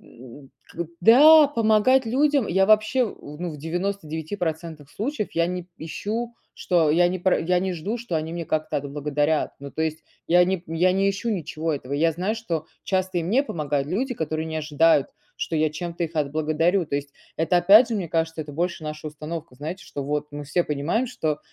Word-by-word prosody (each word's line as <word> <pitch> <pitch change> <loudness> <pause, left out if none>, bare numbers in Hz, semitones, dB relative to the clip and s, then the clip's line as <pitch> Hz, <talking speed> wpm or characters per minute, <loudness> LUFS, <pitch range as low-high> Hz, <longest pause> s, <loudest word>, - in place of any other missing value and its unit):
м, 130 +3 -14 0.2
к 170 - -5
да, 295 - +8
помогать 230 +1 +3
людям 280 0 +2
я 190 +2 +3
вообще, 215 +4 +4
у 150 -8 -9
ну, 180 - -3
в 150 - -8
99% 160 -2 -4
случаев 225 0 -3
я 170 0 +1
не 180 0 -3
п - - -33
ищу, 225 +8 -4 0.2
что 170 -4 +2
я 175 +3 +4
не 185 +1 -2
пра 185 +1 +2
я 180 +2 +1
не 190 -1 -1
жду, 195 +8 -3
что 225 -7 -5
они 155 +1 -3
меня 170 0 -4
как-то 155 0 -1
отблагодарят. 145 +2 -1
Ну, 140 - -8
то 160 - -2
есть 160 0 -2 0.3
я 180 +1 +6
не 185 -1 -1
я 170 +3 +2
не 195 +1 +2
ищу 200 +4 -3
ничего 160 -4 -2
этого. 140 -1 -5
Я 165 +3 +2
знаю, 185 +7 -2
что 165 -8 -3 0.2
часто 185 -2 0
и - - -1
мне 240 +10 +2
помогают 145 - -2
люди, 250 - -1
которые 160 -1 -3
не 160 0 -4
ожидают, 155 -1 +3 0.3
что 165 - -3
я 155 0 +2
чем-то 170 +2 -4
их 165 0 -7
отблагодарю. 155 +4 +1
То - - -4
есть, 140 0 -6 0.2
это 165 +2 +2
опять 205 +7 +7
же, 235 - -2
мне 180 -5 -3
кажется, 165 0 -1
это 145 -1 -7
больше 170 0 -2
наша 155 0 -6
установка. 155 -1 -7
Знаете, 170 +6 -6
что 140 - -6
вот 150 +1 -2
мы 145 0 -6
все 165 +5 +1
понимаем, 150 - -1
что 155 -11 -2
170 Hz, 200 wpm, -24 LUFS, 155-195 Hz, 0.3 s, да